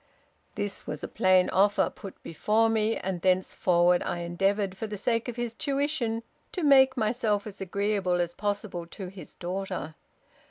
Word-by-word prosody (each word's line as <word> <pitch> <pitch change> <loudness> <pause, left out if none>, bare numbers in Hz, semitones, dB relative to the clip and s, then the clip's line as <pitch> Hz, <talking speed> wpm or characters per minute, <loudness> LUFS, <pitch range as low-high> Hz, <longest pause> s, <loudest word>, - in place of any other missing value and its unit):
' - - -40
"This 205 -1 -4
was 150 - -5
a - - -2
plain 185 -1 +4
offer 200 +2 +3
put 195 - -11
before 220 +7 +2
me, 220 0 +1
and 185 -2 -3
thenceforward 180 -1 +3
I 175 0 -3
endeavored, 195 +3 0
for 220 +3 -4
the 210 -1 -5
sake 230 +4 0
of 245 - -4
his 240 -1 -3
tuition, 275 -4 -1 0.3
to 360 - -3
make 265 -2 +6
myself 215 -2 +1
as 210 -2 -9
agreeable 195 -1 0
as 175 0 -1
possible 205 -4 -3
to 185 +1 -7
his 185 -1 -12
daughter. 185 -2 -4
200 Hz, 165 wpm, -28 LUFS, 185-225 Hz, 0.3 s, make